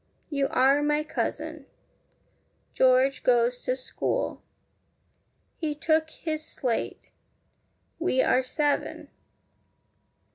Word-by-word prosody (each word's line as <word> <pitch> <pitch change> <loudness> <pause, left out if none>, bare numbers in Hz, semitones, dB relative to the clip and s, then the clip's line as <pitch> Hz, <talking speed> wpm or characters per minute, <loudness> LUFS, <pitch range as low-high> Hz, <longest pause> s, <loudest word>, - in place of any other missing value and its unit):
You 280 -2 +1
are 270 +3 +4
my 295 +1 +1
cousin. 315 - -4 1.1
George 260 +1 +4
goes 245 0 +2
to 255 - +1
school. 265 - -2 1.2
He 305 -3 -2
took 315 +1 +1
his 310 -1 -4
slate. 250 -6 -3 1.0
We 325 -6 +2
are 255 - +3
seven. 290 +3 -1
280 Hz, 85 wpm, -27 LUFS, 255-310 Hz, 1.2 s, are